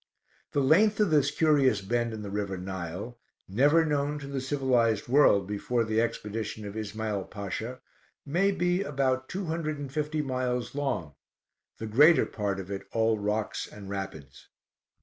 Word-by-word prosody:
The 145 - +2
length 200 +10 +4
of 210 -5 +3
this 145 -2 +4
curious 145 -8 +3
bend 120 +4 -1
in 110 -1 -6
the 100 - -6
river 100 -2 -2
Nile, 95 +5 -6 0.3
never 145 +11 +4
known 145 -1 0
to 145 - -7
the 140 -1 -3
civilized 130 -5 +1
world 120 -7 +5
before 105 +4 -1
the 110 0 +1
expedition 110 -1 -3
of 100 0 -7
Ismael 110 -2 -3
Pasha, 110 +5 -5 0.4
may 175 +7 +2
be 180 -1 +1
about 130 -5 -1
two 190 +1 -3
hundred 160 -2 -2
and 140 -2 -7
fifty 150 0 -1
miles 125 -2 -2
long, 135 - -2 0.6
the 110 - -5
greater 145 +10 +6
part 100 -2 -3
of 95 0 -7
it 100 - -5
all 110 -1 +2
rocks 105 +1 -2
and 100 -1 -10
rapids. 95 -9 -7
120 Hz, 160 wpm, -28 LUFS, 105-145 Hz, 0.6 s, greater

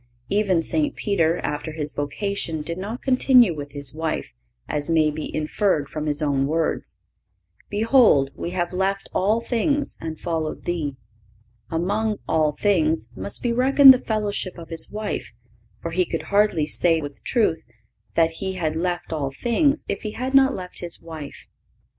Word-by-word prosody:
Even 195 -5 +2
St. 295 - +1
Peter, 170 -6 +1
after 150 +1 -3
his 150 -1 -3
vocation, 160 +1 -3
did 170 +3 -4
not 215 +6 -5
continue 255 -6 +5
with 145 -1 -7
his 140 -2 -4
wife, 160 +1 -3 0.3
as 145 +1 -1
may 155 -2 +3
be 155 +1 -5
inferred 155 0 0
from 155 0 -4
his 145 +1 -1
own 140 -2 +1
words: 160 +1 -1 0.7
"Behold, 215 - +4
we - - -4
have 175 0 -2
left 195 +2 -1
all 215 +5 +2
things, 280 +5 0
and 160 -1 -5
followed 160 -2 -3
Thee."(518) 115 - -7
Among 210 +5 0
"all 155 -2 +2
things" 160 - +1
must 95 +2 -4
be 240 -1 +1
reckoned 265 +2 +8
the 255 - -1
fellowship 210 -5 -2
of 165 -1 -10
his 165 -1 -3
wife, 210 - -4 0.5
for 170 - -3
he 180 +2 +2
could - - -4
hardly 200 -7 +3
say 165 +1 +2
with 145 -2 -8
truth 220 -10 +1 0.5
that 165 -1 +3
he 190 -1 -2
had 160 -4 -2
left 175 0 -2
all 145 -3 -1
things 260 - +1
if - - -3
he 215 -1 -5
had 260 +2 -4
not 270 0 +5
left 180 -1 -8
his 175 -1 -1
wife. 160 -3 -9
170 Hz, 165 wpm, -23 LUFS, 150-210 Hz, 0.7 s, reckoned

